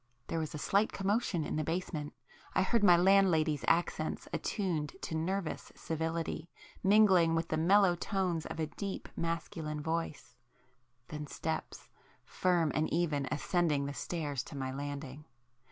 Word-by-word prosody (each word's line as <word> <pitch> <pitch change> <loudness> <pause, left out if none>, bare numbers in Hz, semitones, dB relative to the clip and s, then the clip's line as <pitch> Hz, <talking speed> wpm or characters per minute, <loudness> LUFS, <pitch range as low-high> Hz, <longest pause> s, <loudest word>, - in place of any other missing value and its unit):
There 165 - -1
was 155 -1 -4
a - - -3
slight 200 +8 +2
commotion 200 -3 0
in - - -2
the 155 - 0
basement,—I 165 +1 -3
heard 225 +3 +1
my 175 -4 +8
landlady's 175 -6 +4
accents 165 -2 0
attuned 170 -8 -2
to - - -4
nervous 180 +2 -2
civility, 165 0 -3 0.3
mingling 190 -5 +5
with 165 0 0
[p - - -11
17] 155 - +1
the 160 - 0
mellow 195 -2 +6
tones 180 -3 -1
of - - -6
a 160 - +1
deep 190 +6 -6
masculine 165 -2 -3
voice,—then 125 -3 -7
steps, 160 +2 -5 0.3
firm 175 -4 +1
and 155 +1 0
even, 155 -5 0
ascended 150 -2 +1
the 140 - -4
stairs 145 -5 -3
to 145 - -8
my 130 -1 -2
landing. 145 +1 -6
165 Hz, 145 wpm, -32 LUFS, 150-180 Hz, 0.3 s, my